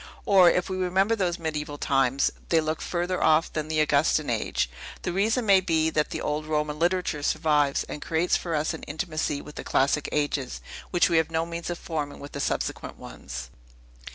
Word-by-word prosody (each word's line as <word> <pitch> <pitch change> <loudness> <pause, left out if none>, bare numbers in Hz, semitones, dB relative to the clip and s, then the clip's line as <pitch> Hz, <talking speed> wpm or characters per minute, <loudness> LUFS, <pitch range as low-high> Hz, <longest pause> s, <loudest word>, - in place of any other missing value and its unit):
Or, 190 -3 +7
if 180 - +1
we 185 - -3
remember 190 +4 +2
these 180 -5 0
mediaeval 150 -3 -4
times, 135 -1 +2 0.2
they 165 - +4
look 155 0 -2
further 180 +1 -1
off 160 +1 +3
than 155 -1 -2
the 155 0 0
Augustan 150 -1 +2
age. 110 - 0 0.4
The 175 - -2
reason 220 +5 +1
may 195 -2 +6
be, 160 -3 +1
that 150 -1 +1
the - - -4
old 150 +1 -2
Roman 150 -1 -1
literature 175 -3 0
survives, 150 -2 +2
and 150 - -7
creates 165 +2 +1
for 170 -2 -2
us 155 +2 0
an 160 - -7
intimacy 155 -2 -2
with 150 - -12
the - - -5
classic 140 +2 +1
ages, 145 -3 -1 0.3
which 175 - +3
we 165 - +2
have 160 0 +2
no 165 0 0
means 170 0 -5
of 175 - -3
forming 150 -4 -4
with 140 - -9
the 140 - -6
subsequent - - -2
ones. - - -8
160 Hz, 195 wpm, -26 LUFS, 150-175 Hz, 0.4 s, Or